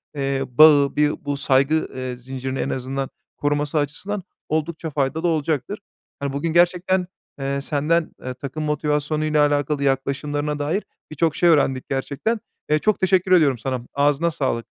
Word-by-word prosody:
eee, 135 -1 -1
bağı, 145 +1 +6
bi 150 0 +1
bu 145 -1 -1
saygı, 140 +3 +2
eee, 130 -1 -4
zincirini 130 +1 -5
en - - -1
azından 135 +1 -3 0.3
koruması 145 +1 0
açısından 180 +7 -2 0.3
oldukça 160 +1 -2
faydalı 145 +3 -1
olacaktır. 160 +4 -1 0.4
Hani, 140 -1 -3
bugün 160 +3 -2
gerçekten, 180 +1 +3 0.3
eee, 140 0 -2
senden, 155 +3 0
eee, 130 0 -4
takım 140 +4 -6
motivasyonuyla 150 0 +1
alakalı 145 0 0
yaklaşımlarına 145 +2 -1
dair 160 +8 -1 0.3
birçok 155 0 0
şey 175 - +4
öğrendik 135 -4 +2
gerçekten. 140 - -1 0.3
Eee, 150 0 +3
çok 215 +5 +1
teşekkür 190 0 +2
ediyorum 150 -8 +5
sana. 130 +2 -3
Ağzına 145 +4 +2
sağlık. 130 -6 -2
145 Hz, 145 wpm, -22 LUFS, 135-160 Hz, 0.4 s, bağı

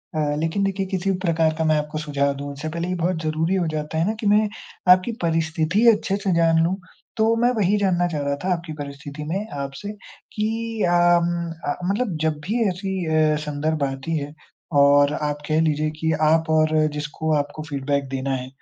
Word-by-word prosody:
अ, 150 -1 0
लेकिन 165 +5 0
देखिए 195 0 -1
किसी 190 +1 0
भी 185 - -1
प्रकार 160 -2 +2
का 160 - 0
मैं - - +4
आपको 150 +1 -3
सुझाव 140 -2 0
दूँ 140 +1 -6
उससे 150 +3 -5
पहले 170 +2 -3
ये 180 - -1
बहुत 175 -1 0
ज़रूरी 160 +4 0
हो 175 -3 0
जाता 150 +1 -3
है 165 - +2
ना, 215 - +1
कि 220 -1 -3
मैं 210 +1 +4 0.4
आपकी 185 +6 +4
परिस्थिति 165 +5 +1
अच्छे 200 -2 -1
से 195 - +1
जान 165 -1 +4
लूँ 175 +3 +1 0.4
तो 225 +1 +3
मैं 245 +1 +4
वही 205 0 +2
जानना 180 -3 +2
चाह 155 -4 -3
रहा 140 0 -1
था 185 0 +2
आपकी 170 -2 -5
परिस्थिति 145 0 -7
में 200 +3 -2 0.2
आपसे 140 +9 -6 0.4
कि 225 +1 -2
अ, 175 - +2 0.3
म 170 -1 -2 0.2
अ, - - -2 0.2
मतलब 205 -4 -1
जब 155 -1 0
भी 230 +3 +1
ऐसी 190 0 -3
अ, 155 -1 +3
संदर्भ 150 +2 -1
बनती 135 +4 -3
है 145 0 -5 0.5
और 145 +1 +5
आप 150 -1 -2
कह 155 +1 +2
लीजिए 155 -1 +1
कि 160 0 +1
आप 160 +1 +3
और 155 0 +3 0.2
जिसको 150 +1 -3
आपको 145 +1 -2
फ़ीडबैक 140 -1 -1
देना 135 0 -2
है 130 0 -5
160 Hz, 205 wpm, -23 LUFS, 150-185 Hz, 0.5 s, और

